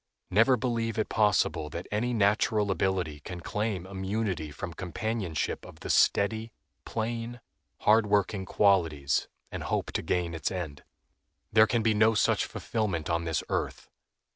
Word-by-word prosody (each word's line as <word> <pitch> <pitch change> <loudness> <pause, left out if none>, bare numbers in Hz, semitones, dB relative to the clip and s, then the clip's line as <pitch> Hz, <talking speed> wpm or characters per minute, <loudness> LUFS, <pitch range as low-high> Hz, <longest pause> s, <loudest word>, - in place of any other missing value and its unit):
Never 115 +6 +5
believe 115 -1 -1
it 110 - 0
possible 105 -7 +2
that 85 +4 -6
any 115 +4 0
natural 105 -1 +2
ability 90 -6 -1
can 90 +4 -7
claim 105 0 -2
immunity 95 -3 -2
from 85 +4 -6
companionship 95 -1 -3
of - - -13
the - - -2
steady, 110 +3 +2 0.3
plain, 115 +1 -3 0.4
hard 110 0 +5
working 100 -1 +1
qualities, 80 -10 +2 0.2
and - - -5
hope - - -2
to - - -1
gain 85 +1 -1
its 80 - -2
end. 85 -6 -5 0.7
There 110 0 +7
can 115 -1 +1
be 110 -1 +3
no 110 +1 +4
such - - +2
fulfillment 95 -9 -2
on 85 0 0
this 80 -2 -1
earth. - - -3
100 Hz, 145 wpm, -29 LUFS, 85-110 Hz, 0.7 s, There